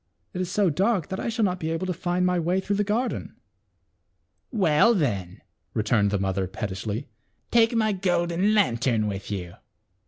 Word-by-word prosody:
It 185 - -3
is 180 - -2
so 190 -2 +2
dark 190 +1 +1
that 190 - -3
I - - -2
shall 225 -1 +1
not 185 -1 -1
be 160 - -3
able 165 +3 -2
to 185 - -1
find 180 +1 -1
my 180 -1 +2
way 175 +3 +1
through 200 +1 -1
the 205 - +2
garden." 225 +4 -2 0.6
" 90 0 -48
Well, 160 +10 +5
then," 100 - -2 0.3
returned 110 -2 +2
the 100 - 0
mother 95 -1 -1
pettishly, 105 +6 -4 0.4
"take 230 0 +4
my 220 -1 +2
golden 180 +1 +1
lantern 120 - +2
with 100 -1 -4
you." 90 -4 -5
170 Hz, 180 wpm, -25 LUFS, -, 0.6 s, Well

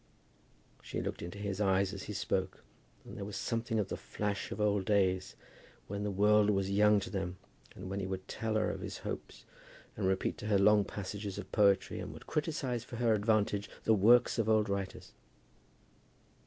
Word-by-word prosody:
She - - -5
looked - - -4
into 90 +4 -6
his 100 0 -3
eyes 95 -1 +2
as 100 - -6
he 105 - -5
spoke, 95 -1 -2 0.4
and - - -10
there 100 - -5
was 100 0 -6
something 115 -1 -1
of 100 -3 0
the - - -2
flash 105 -1 -3
of 100 - -5
old 105 -2 +2
days, 95 -3 +1 0.5
when 100 +1 -4
the 105 - -1
world 105 +1 +4
was 100 -1 +1
young 105 +1 +5
to - - -6
them, 95 -2 -3 0.4
and - - -8
when 100 +1 -3
he 95 - -3
would 95 0 -5
tell 110 -1 -2
her 110 - +2
of - - -6
his - - -5
hopes, - - -6 0.5
and 100 -3 -1
repeat 95 0 0
to 105 - -5
her 105 -2 +3
long 105 +1 +5
passages 100 0 -5
of - - -7
poetry, 100 -2 +3
and - - -6
would - - -12
criticize 145 -6 -2
for 120 - -9
her 115 -1 +2
advantage 105 -1 +1
the 110 - +4
works 120 +4 +5
of 110 -1 +1
old 110 -2 +3
writers. 100 -1 -4
100 Hz, 195 wpm, -33 LUFS, 95-110 Hz, 0.5 s, young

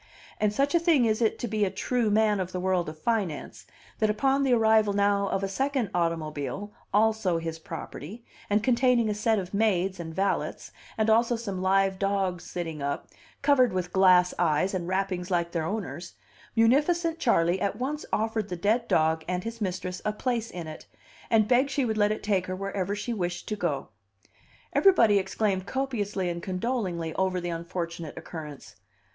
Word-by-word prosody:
And 210 -1 +2
such 275 +8 +1
a 340 - +5
thing 325 -7 +3
is 220 0 +1
it 225 - +2
to 240 - -3
be 215 -1 0
a 195 - +2
true 240 +2 0
man 210 -1 +3
of 185 -1 -3
the 180 - -2
world 180 -2 0
of 155 - -9
finance, 195 -4 -2 0.3
that 215 - +2
upon 270 +6 +2
the 270 -2 +2
arrival 220 -3 +4
now 200 0 +2
of 195 0 -1
a - - +1
second 265 +2 -1
automobile, 165 +2 -2 0.2
also 215 -4 +2
his 165 0 -4
property, 165 - -8 0.2
and 205 +1 +2
containing 245 -2 +3
a - - 0
set 215 +1 +1
of 185 -1 -4
maids 195 -3 +1
and 165 -1 -5
valets, 195 +1 -1 0.3
and 220 0 +1
also 230 +2 +3
some 200 -5 -4
live 190 0 +2
dogs 195 -3 0
sitting 165 -4 -5
up, 140 0 -3 0.3
covered 270 -5 +4
with 180 -1 -3
glass 180 -1 +5
eyes 175 +3 +2
and 175 -2 -2
wrappings 185 -1 -1
like 170 -2 0
their 165 -2 -1
owners, 190 -3 -5 0.4
munificent 315 +9 +3
Charley 180 - +2
at 200 0 0
once 275 +6 -3
offered 220 -1 -1
the 180 - -3
dead 215 +7 +1
dog 160 0 +2
and 180 0 -2
his 230 0 -6
mistress 185 -1 -3
a 210 - 0
place 230 +1 -2
in 175 -2 -6
it, 155 0 -9 0.4
and 220 -2 +4
begged 255 +3 +3
she 275 -1 0
would 220 -2 -1
let 205 0 +3
it 215 - -3
take 195 -3 0
her 185 - -3
wherever 195 0 -2
she 210 +4 -3
wished 175 -4 -3
to 215 - -1
go. 170 -9 -2 0.8
Everybody 230 - +5
exclaimed 190 0 -1
copiously 210 -8 -2
and 170 0 -3
condolingly 185 -5 -2
over 190 -1 0
the 175 0 -4
unfortunate 170 -1 -5
occurrence. 150 - -9
200 Hz, 185 wpm, -27 LUFS, 180-225 Hz, 0.8 s, a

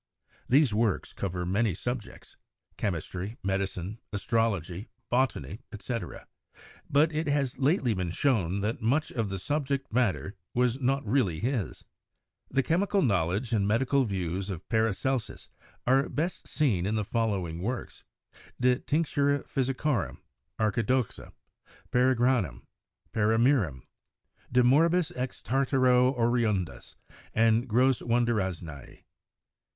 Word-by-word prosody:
These 135 -3 +5
works 110 -3 0
cover 90 -2 -3
many 100 +1 +1
subjects 120 -3 -6 0.2
— - - -43
chemistry, 95 +3 -3
medicine, 95 +1 -2
astrology, 100 -3 -1 0.2
botany, 115 - 0
etc. 115 +2 -5 0.3
— - - -21
but 155 +3 +3
it 155 +1 -1
has 140 -3 0
lately 135 - +2
been 90 -3 -2
shown 100 - +1
that 105 +3 -2
much 135 +8 +1
of 115 -4 -2
the 95 - -3
subject 140 - -2
matter 110 -5 0 0.2
was 125 +1 +2
not 135 +1 +1
really 105 - +1
his. 120 -2 -2 0.7
The 135 0 +1
chemi 180 +8 +1
cal 200 -2 +3
knowledge 100 +2 +1
and 100 -3 +2
medical 130 +5 +2
views 95 -1 -3
of 90 -3 -6
Paracelsus 115 +2 -1 0.4
are 135 +3 +3
best 170 +5 -3
seen 105 - +1
in 110 - 0
the 110 - 0
following 95 -8 -1
works: 120 +5 -4 0.6
'De 125 0 +4
Tinctura 145 -2 +1
Physicorum,' 135 -2 -1 0.4
'Archidoxa/ 115 +2 0 0.6
'Paragranum,' 125 - +2 0.5
'Paramirum/ 110 - +2 0.7
'De 125 0 +4
morbis 165 +6 +4
ex 125 0 -4
Tartaro 130 -1 +3
Oriundis' 115 -6 0 0.4
and 115 +2 +3
'Grosse 125 +3 +3
Wundarznei.' 95 - -2
115 Hz, 115 wpm, -28 LUFS, 100-130 Hz, 0.7 s, These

